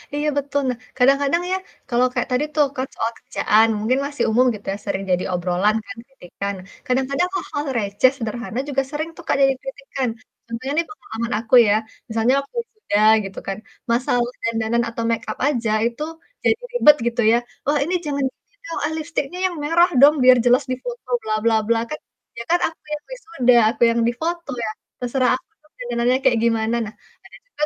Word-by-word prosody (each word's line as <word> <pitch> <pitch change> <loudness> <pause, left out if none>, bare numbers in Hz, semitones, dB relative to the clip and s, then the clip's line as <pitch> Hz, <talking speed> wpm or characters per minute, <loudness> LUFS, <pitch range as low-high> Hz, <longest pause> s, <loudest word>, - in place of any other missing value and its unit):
Iya 295 +1 -1
betul, 285 0 0
nah, 245 - -2 0.2
kadang-kadang 275 +6 +3
ya 375 - +2 0.3
kalau 245 +1 +3
kayak 245 - -1
tadi 260 +4 +1
tuh, 295 -1 +5
kan 260 +1 -1
soal 230 +1 -1
kerjaan, 220 +2 +3
mungkin 245 +5 +1
masih 285 0 -2
umum 245 +4 +4
gitu 205 - -13
ya - - -5
sering 195 - -2
jadi 180 0 +2
obrolan 180 +4 +1
kan, 250 - -8
kritikan, 200 -5 -6 0.3
kadang-kadang 270 +7 0
hal-hal 295 -5 -3
receh 205 +4 +3
sederhana 235 +1 -4
juga 270 -1 +1
sering 310 +2 -3
tuh 345 - -11
Kak - - +2
jadi 270 0 +5
kritikan. 270 -2 -4 0.4
Contohnya 235 +4 -5
nih 335 - +2
pengalaman 235 - -5
aku 230 +3 +2
ya, 205 - +4 0.4
misalnya 225 +3 +2
waktu 280 - -10
wisuda 430 - -2 0.2
gitu 195 - -7
kan. 195 - -2 0.3
Masalah 245 0 +1 0.2
dandanan 230 +1 0
atau 230 0 -4
make 230 - -1
up - - -7
aja 235 -6 0 0.2
itu 240 +5 -5 0.4
jadi - - +4 0.2
ribet 300 -12 +7
gitu 240 0 0
ya, 235 - +5 0.3
"Wah 295 +1 +3
ini 360 - -2
jangan 280 -2 -1
gini 410 +10 -14
dong, 330 - -4
ah, 315 - -1
lipstiknya 320 +1 -3
yang 355 - -6
merah 340 +4 +4
dong 295 +2 +8
biar 255 0 +8
jelas 250 +3 +5
di 255 - +1
foto, 245 +1 -7
bla 220 - -2
bla 230 -1 +3
bla." 230 0 +3
Kan, 305 - -5 0.4
ya 235 - -4
kan 350 - +4
aku 325 - -10
yang 295 - -5
wisuda, 420 - +1 0.2
aku 240 - -14
yang 235 - 0
difoto 325 +5 -3
ya, - - -2 0.3
terserah 250 0 +1
aku - - -22 0.2
dong 305 - -28
dandanannya 245 +1 +1
kayak 240 -3 +4
gimana. 225 0 +1
Nah 215 - -8 0.7
ada 300 - +2
250 Hz, 190 wpm, -21 LUFS, 230-290 Hz, 0.7 s, dong